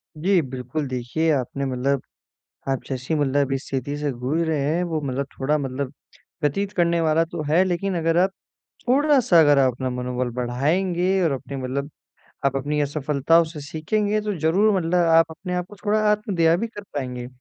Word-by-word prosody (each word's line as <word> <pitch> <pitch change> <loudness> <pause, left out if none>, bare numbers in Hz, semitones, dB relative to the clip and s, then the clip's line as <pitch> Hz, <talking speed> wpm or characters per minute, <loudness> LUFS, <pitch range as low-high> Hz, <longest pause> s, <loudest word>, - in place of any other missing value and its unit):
जी 180 +4 +2
बिल्कुल, 130 +2 -4
देखिए 130 +6 -1
आपने 140 0 -1
मतलब 135 +1 0 0.7
आप 135 -1 -1
जैसी 130 +4 -2
मतलब 140 -1 +1
इस 135 +1 -3
स्थिति 135 +1 -3
से 150 0 -2
जूझ 130 +6 -2
रहे 155 -2 0 0.2
हैं 175 - 0
वो 165 -3 -2
मतलब 140 0 -2
थोड़ा-सा 150 +3 +1
मतलब 135 -1 -4 0.5
व्यथित 195 +8 0
करने 170 -1 +2
वाला 160 0 +3
तो 165 0 -6
है। 170 +5 +5
लेकिन 185 +1 -1
अगर 165 0 +1
आप 185 +2 +4 0.6
थोड़ा-सा 265 - +5
अगर 145 -2 +5
आप 130 -2 +4
अपना 130 +1 -3
मनोबल 125 0 -2
बढ़ाएँगे 175 +10 +1
और 160 - +2
अपने 140 +1 -5
मतलब 135 +2 -3 0.5
आप 135 0 +2
अपनी 145 +2 -1
असफलताओं 150 +3 +2
से 160 -1 -8
सीखेंगे 205 +9 -1
तो 210 -1 -2
ज़रूर 190 +7 +3
मतलब 170 -1 -1
आप 165 0 +6
अपने 180 +3 -5
आप 180 0 -2
को 205 - -11
थोड़ा 215 +1 +2
आत्मदया 185 -6 +2
भी 220 +6 -2
कर 215 -2 -9
पाएँगे। 125 -3 -4
155 Hz, 180 wpm, -23 LUFS, 135-175 Hz, 0.7 s, आप